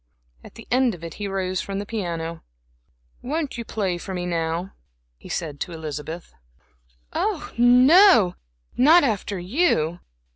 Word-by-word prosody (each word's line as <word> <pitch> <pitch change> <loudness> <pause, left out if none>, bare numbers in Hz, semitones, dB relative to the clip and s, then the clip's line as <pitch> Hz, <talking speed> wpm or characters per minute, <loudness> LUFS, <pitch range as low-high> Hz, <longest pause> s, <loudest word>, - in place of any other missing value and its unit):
At - - -14
the 230 - -12
end 250 -3 +2
of 170 - -15
it 165 -2 -6
he 205 - -2
rose 185 -1 -2
from 195 0 -5
the 200 - -4
piano. 170 -6 -4 0.8
"Won't 290 -1 -3
you - - -3
play 195 -6 -2
for 190 +2 -6
me 180 0 -3
now," 170 +1 -2 0.5
he - - -13
said 150 -3 -4
to 175 - -4
Elizabeth. 160 +1 -7 0.8
"Oh, - - -2
no, 250 - +6 0.4
not 310 +7 +6
after 210 -5 -1
you." 180 - 0
190 Hz, 145 wpm, -23 LUFS, 170-245 Hz, 0.8 s, no